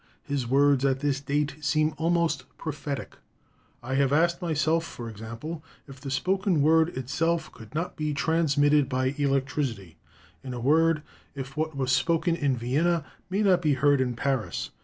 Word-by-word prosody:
His 140 -4 -2
words 140 +1 +3
at 135 -1 +1
this 140 -2 0
date 145 +1 -1
seem 155 +3 +2
almost 165 -4 0
prophetic: 145 -2 -5 0.7
"I 130 +2 -4
have 135 0 +2
asked 170 +4 +2
myself, 165 -1 +1
for 120 -7 -8
example, 115 +9 -7 0.2
if 135 -2 -12
the 135 - -6
spoken 185 +3 +1
word 160 +2 +4
itself 160 +6 -1
could 115 +3 -14
not 170 +3 -2
be 150 -1 -1
transmitted 145 -1 +2
by 130 0 0
electricity; 135 - -1 0.4
in 130 -2 -5
a - - -5
word, 155 +4 +3 0.3
if 135 0 -7
what 155 -1 -2
was 130 -1 0
spoken 165 +5 +2
in 140 -6 0
Vienna 150 +7 +1 0.2
may 195 +3 0
not 185 -3 +4
be 150 -4 +2
heard 140 0 +3
in 125 -2 -1
Paris. 130 -1 -2
145 Hz, 160 wpm, -27 LUFS, 130-160 Hz, 0.7 s, word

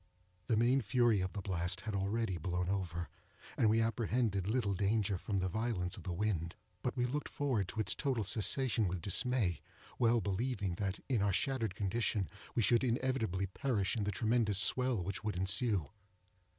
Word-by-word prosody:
The 110 - +2
main 125 +4 +4
fury 115 -1 +3
of 95 0 -3
the 100 -2 -5
blast 90 -1 -2
had 110 - -4
already 100 -1 -1
blown 90 +2 -1
over, 85 -3 -2 0.5
and 110 - +3
we 110 +1 +3
apprehended 115 -3 0
little 105 -3 +1
danger 100 +1 +1
from 100 +2 -3
the 95 -1 0
violence 100 -3 -1
of - - -9
the 90 - -4
wind; 85 -3 -1 0.3
but 125 +1 -2
we 125 - +2
looked 145 +4 -3
forward 125 -10 0
to 110 - -6
its 110 - +2
total 130 -6 -1
cessation 115 +2 +2
with 90 -1 -3
dismay; 100 - +1 0.4
well 120 -1 +4
believing, 100 -1 -1
that, 100 -2 -2
in 125 -6 +1
our 100 0 +2
shattered 115 -2 0
condition, 105 -1 -1 0.3
we 115 - +2
should 120 +3 +4
inevitably 120 -6 0
perish 100 0 -1
in 110 - -1
the 105 - 0
tremendous 110 0 +1
swell 120 +1 +2
which 100 +3 -4
would 105 -2 -2
ensue. 95 - +1
105 Hz, 175 wpm, -34 LUFS, 95-120 Hz, 0.5 s, main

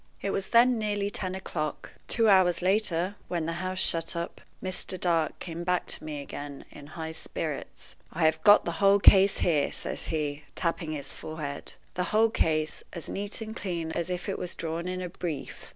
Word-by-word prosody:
It 200 - -2
was 195 -1 -2
then 240 0 +5
nearly 205 -1 -1
ten 185 -2 -3
o'clock. 155 -5 -4 0.2
Two 230 -2 +3
hours 185 -3 +5
later, 190 -2 +2
when 170 -3 -1
the 165 - -1
house 185 0 -3
shut 165 -1 +1
up, 170 0 -4 0.2
Mr. 185 0 -3
Dark 165 -3 +1
came 170 -1 -6
back 180 0 +1
to - - -3
me 150 -2 -4
again 145 0 -7
in 145 - -11
high 160 +1 -5
spirits. 160 - -6 0.2
"I 165 - -1
have 160 - +3
got 205 0 +7
the 170 - 0
whole 200 0 +7
case 195 0 +7
here," 150 -5 +2
says - - -5
he, 150 -2 -2
tapping 165 -2 -1
his 145 -2 -5
forehead 155 -3 -6 0.2
"the 180 - -1
whole 220 +3 +3
case, 155 -6 +1
as 170 - -7
neat 205 +3 -2
and 220 0 -5
clean 170 -6 -3
as 170 +1 -2
if 180 -1 -3
it - - -2
was 180 - -3
drawn 165 +2 -3
in 185 0 -3
a 180 - -4
brief. 170 -5 -5
175 Hz, 195 wpm, -28 LUFS, 160-195 Hz, 0.2 s, got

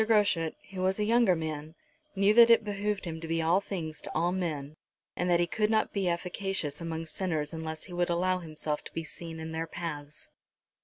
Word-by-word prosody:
Groschut, 205 -7 +3 0.2
who 185 -1 -4
was 190 +1 +2
a - - +2
younger 225 -3 +4
man, 155 -1 -4 0.4
knew 200 +2 +4
that 235 +1 +8
it 230 -1 +6
behoved 205 -1 -2
him 160 -1 -5
to 165 - -5
be 165 0 0
all 165 +4 +3
things 170 -6 -5
to - - -4
all 170 +3 +2
men, 155 -6 -3 0.4
and 180 +1 0
that 175 -1 +4
he 175 - +4
could 210 +5 0
not 220 -1 +2
be 195 -3 +1
efficacious 175 -3 -2
among 165 -1 -3
sinners 160 -2 -2
unless 160 -1 -4
he 180 - -9
would 175 0 +1
allow 185 +2 +2
himself 155 -2 -3
to - - -10
be 165 - -3
seen 165 +1 -7
in 160 0 -5
their 160 0 -2
paths. 150 -3 -6
170 Hz, 210 wpm, -30 LUFS, 160-195 Hz, 0.4 s, that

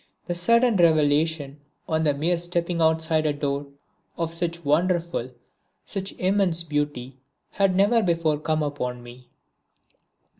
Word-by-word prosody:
The 175 - -2
sudden 235 +5 +3
revelation, 155 -3 +2 0.3
on 160 0 0
the 145 -2 +2
mere 165 +4 0
stepping 175 0 -2
outside 160 -1 +2
a 150 - +1
door, 145 0 -3 0.5
of 165 -1 -2
such 170 -1 -3
wonderful, 170 -3 0 0.6
such 195 -1 -4
immense 185 -3 +1
beauty 145 -4 -3 0.3
had 195 -2 +1
never 205 +5 +4
before 165 -5 0
come 155 0 -1
upon 125 -4 -4
me. 120 +1 -13
160 Hz, 125 wpm, -24 LUFS, 145-175 Hz, 0.6 s, never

